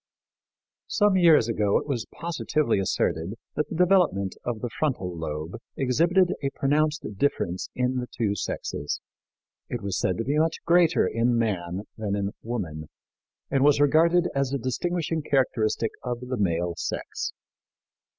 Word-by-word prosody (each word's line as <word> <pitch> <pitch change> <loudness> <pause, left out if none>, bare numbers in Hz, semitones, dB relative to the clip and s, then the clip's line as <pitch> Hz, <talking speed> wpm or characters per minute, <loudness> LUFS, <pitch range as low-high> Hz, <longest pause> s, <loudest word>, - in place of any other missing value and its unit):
Some 210 -2 +3
years 165 -10 +6
ago 105 -3 +2
it - - -3
was 125 -6 -2
positively 155 -7 0
asserted 90 -1 -1 0.2
that 150 -1 -1
the - - -5
development 175 - +3
of 120 -3 -3
the 120 - -2
frontal 110 - -1
lobe 80 0 -4 0.2
exhibited 170 +8 +3
a 140 - 0
pronounced 150 +2 +1
difference 95 -8 -1
in 125 0 0
the 125 -1 -2
two 110 -5 -1
sexes. 75 -7 -3 0.7
It - - -4
was 100 -3 -1
said 95 -3 0
to - - -1
be 145 +5 +1
much 160 +1 +2
greater 170 -1 +4
in 120 +1 +1
man 95 -4 -1 0.2
than 105 -2 -1
in 100 0 -1
woman 80 -10 -4 0.6
and 135 -1 +3
was 145 0 +5
regarded 165 +4 +4
as 140 -1 0
a 140 - 0
distinguishing 165 +6 -1
characteristic 120 -6 +1
of 125 -1 -3
the 125 0 -3
male 85 -3 0
sex. - - -4
125 Hz, 150 wpm, -26 LUFS, 100-155 Hz, 0.7 s, years